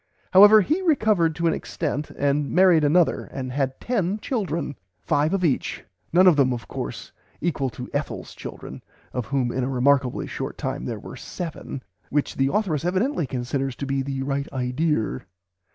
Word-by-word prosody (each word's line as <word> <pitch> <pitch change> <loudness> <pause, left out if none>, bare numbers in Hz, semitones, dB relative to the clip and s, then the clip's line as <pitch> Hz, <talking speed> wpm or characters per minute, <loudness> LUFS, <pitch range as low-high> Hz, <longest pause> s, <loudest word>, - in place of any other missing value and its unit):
However 205 +3 +9
he 315 - 0
recovered 215 - +2
to 170 - -2
an 165 - +3
extent 150 -2 -3
and 145 0 +1
married 180 -3 +5
Another 160 +3 +3
and 130 -2 -6
had 135 0 -1
ten 205 -5 0
children, 185 - -2 0.3
"five 150 +3 +2
of 195 -2 +1
each," 145 - -1 0.3
none 180 +3 +5
of 180 -4 +7
them 135 -2 +4
of 120 - -6
course - - -6 0.3
equal 145 -5 -1
to 125 +1 -8
Ethel's 145 +1 -4
children, - - -9 0.3
of 125 -3 -3
whom 130 -3 0
in 130 - -1
a 125 - -1
remarkably 130 0 +2
short - - -5
time - - -3
there - - -3
were - - -9
seven, 160 -6 -6 0.3
which 145 0 0
the 135 0 +2
authoress 180 -9 0
evidently 185 - 0
considers 130 +1 -2
to 140 - -5
be 135 0 0
the 135 0 -3
right 140 +1 -2
"idear." 125 - -1
145 Hz, 170 wpm, -24 LUFS, 135-180 Hz, 0.3 s, However